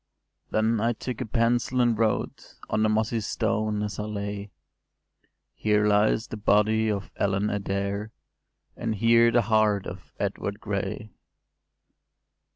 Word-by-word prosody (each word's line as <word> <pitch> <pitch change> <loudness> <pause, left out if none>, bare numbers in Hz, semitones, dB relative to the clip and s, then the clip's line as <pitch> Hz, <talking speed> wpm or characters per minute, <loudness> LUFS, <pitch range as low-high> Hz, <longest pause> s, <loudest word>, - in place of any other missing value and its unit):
’ - - -51
“Then 110 +1 +1
I 115 +2 +1
took 125 +2 -5
a 125 - -3
pencil, 120 +2 +1
and 120 -2 +3
wrote 110 0 -2 0.2
On 110 - +1
the 110 - +3
mossy 110 +2 +1
stone, 110 0 -1
as 105 0 -4
I 105 - -2
lay, 100 -1 -5 1.0
‘Here 105 -1 +1
lies 105 +2 +3
the 110 - -7
body 110 +1 +3
of 100 -1 -3
Ellen 100 +1 0
Adair; 100 +1 -2 0.7
And 110 - -2
here 115 +2 +5
the 120 0 +3
heart 105 -2 +2
of - - -9
Edward 100 +1 -3
Gray! 105 +1 -4
110 Hz, 140 wpm, -26 LUFS, 105-115 Hz, 1.0 s, here